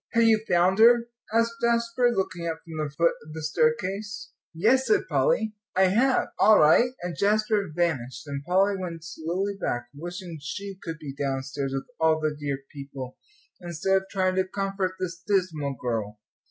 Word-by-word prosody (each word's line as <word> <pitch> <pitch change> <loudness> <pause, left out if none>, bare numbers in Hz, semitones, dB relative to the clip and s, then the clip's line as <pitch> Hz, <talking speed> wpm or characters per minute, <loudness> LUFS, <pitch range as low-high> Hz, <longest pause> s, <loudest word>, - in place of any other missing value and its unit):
"Have 230 0 +4
you 220 -1 +4
found 180 +3 +3
her?" 235 +1 +6 0.2
asked 230 +1 +1
Jasper, 235 +1 +2
looking 185 -5 -2
up 165 -1 -4
from 160 -2 -5
the 150 - -3
foot 165 +4 +2
of 155 0 -11
the 160 0 -6
staircase. 180 +7 -1 0.2
"Yes," 230 +11 +2
said 415 - +2
Polly, 220 - +1 0.2
"I 190 - +5
have." 255 +7 +2
"All 215 -1 +7
right." 160 +11 +5
And 175 -2 -4
Jasper 210 +1 +1
vanished, 145 -7 -2
and 140 -1 -5
Polly 195 +5 +2
went 170 -3 -6
slowly 170 +5 -3
back, 120 0 -2
wishing 175 +2 -7
she 195 +6 -6
could 165 -2 -5
be 150 -4 -7
downstairs 135 0 -3
with 135 - -3
all 160 -1 +3
the 155 -1 -1
dear 140 -2 -4
people, 140 -3 -8 0.4
instead 175 +2 -1
of 190 - -3
trying 185 -1 +1
to 190 - +4
comfort 195 -1 -2
this 170 -2 -4
dismal 160 -8 0
girl. 110 -4 -3
175 Hz, 170 wpm, -26 LUFS, 150-205 Hz, 0.4 s, All